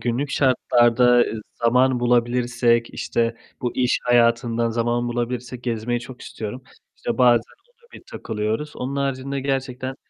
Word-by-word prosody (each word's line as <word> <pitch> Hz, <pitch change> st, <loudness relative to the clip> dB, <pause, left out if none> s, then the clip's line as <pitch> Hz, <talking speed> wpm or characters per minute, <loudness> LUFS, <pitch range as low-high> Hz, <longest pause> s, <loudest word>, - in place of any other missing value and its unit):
günlük 125 Hz, +4 st, -2 dB
şartlarda, 125 Hz, -2 st, +3 dB
ıııı, 115 Hz, -2 st, +2 dB
zaman 125 Hz, +2 st, +2 dB
bulabilirsek, 120 Hz, -1 st, +1 dB
işte 115 Hz, 0 st, -1 dB, 0.3 s
bu 120 Hz, -, -2 dB
iş 125 Hz, -1 st, +2 dB
hayatından 115 Hz, -1 st, +2 dB
zaman 120 Hz, +1 st, -1 dB
bulabilirsek 120 Hz, +1 st, -4 dB
gezmeyi 120 Hz, 0 st, -2 dB
çok 125 Hz, +1 st, -11 dB
istiyorum. 110 Hz, +4 st, -7 dB, 0.3 s
İşte -, -, -4 dB
bazen 120 Hz, -2 st, +5 dB, 0.3 s
ona 475 Hz, 0 st, -28 dB
bir -, -, -12 dB
takılıyoruz. 110 Hz, +7 st, -4 dB
Onun 135 Hz, +2 st, -4 dB
haricinde 140 Hz, 0 st, -2 dB
gerçekten 130 Hz, -1 st, -3 dB
120 Hz, 130 wpm, -22 LUFS, 115-130 Hz, 0.3 s, bazen